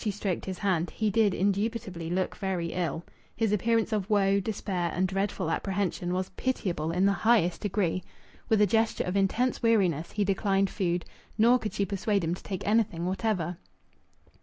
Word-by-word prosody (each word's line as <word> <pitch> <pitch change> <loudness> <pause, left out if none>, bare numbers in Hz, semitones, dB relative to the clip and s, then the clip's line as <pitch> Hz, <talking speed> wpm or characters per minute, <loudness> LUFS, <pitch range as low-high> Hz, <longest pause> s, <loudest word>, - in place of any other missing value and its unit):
She 220 - 0
stroked 200 -3 -2
his 190 -1 -4
hand. 180 -4 0
He 215 -2 -1
did 210 -2 +3
indubitably 200 -3 -1
look 185 +2 -1
very 185 -4 -2
ill. 170 -2 -2 0.3
His 225 -3 +1
appearance 225 +2 +1
of 205 -1 -1
woe, 200 -1 +3
despair, 190 -4 -2
and 185 +2 +2
dreadful 195 -2 -1
apprehension 190 -2 -1
was 185 +1 -1
pitiable 185 -8 -2
in 180 +3 +2
the 200 - +5
highest 200 -4 +2
degree. 190 -3 0 0.5
With 220 -2 +4
a - - +7
gesture 225 +3 +1
of 180 - -3
intense 210 +6 +1
weariness 190 - +2
he 210 - +1
declined 195 0 +1
food, 175 -3 -1 0.3
nor 240 +3 +5
could 215 - -4
she 200 - 0
persuade 200 0 0
him 165 +1 0
to 180 - -7
take 190 -2 -5
anything 205 -6 +1
whatever. 185 -3 -1
195 Hz, 175 wpm, -28 LUFS, 180-215 Hz, 0.5 s, a